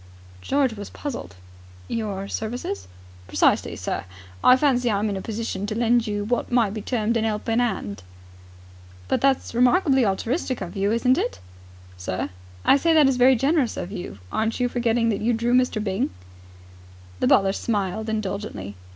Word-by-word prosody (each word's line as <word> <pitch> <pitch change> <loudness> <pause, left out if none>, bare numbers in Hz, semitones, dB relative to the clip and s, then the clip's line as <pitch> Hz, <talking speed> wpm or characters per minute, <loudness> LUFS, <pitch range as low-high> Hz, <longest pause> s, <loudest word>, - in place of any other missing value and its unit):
George 270 - +1
was 205 -2 -8
puzzled. 280 - -6 0.5
"Your 200 -3 -3
services?" 215 - -4 0.4
"Precisely, - - +2
sir. - - -3 0.4
I 255 - +7
fancy 255 -3 +2
I 205 - +1
am 210 +1 0
in - - -2
a 190 - -4
position 215 -2 -4
to 215 - -3
lend 235 0 +2
you 205 -1 -2
what 240 +4 -1
might 230 -5 +2
be 215 - -4
termed 230 0 0
an 225 - 0
'elping 225 +1 0
'and." 100 - -2 1.1
"But - - 0
that's 270 -3 +1
remarkably 255 +3 +4
altruistic 235 - -1
of 180 -3 -6
you, 200 +1 +1
isn't 250 +3 +3
it?" 100 - -2 0.6
"Sir?" 90 +1 -3 0.3
"I - - +6
say 325 +3 +2
that 300 -3 +6
is 265 -2 +2
very 255 +1 +6
generous 275 0 +1
of 175 - -5
you. 175 - -6
Aren't 220 +2 -1
you 250 - +2
forgetting 235 -1 +1
that 205 - -1
you 235 +3 +2
drew 235 +2 0
Mr. 250 -3 +3
Byng?" 195 -2 -1 1.1
The - - +2
butler 195 -1 +4
smiled 210 0 -2
indulgently. 200 - -4
225 Hz, 170 wpm, -24 LUFS, 200-250 Hz, 1.1 s, I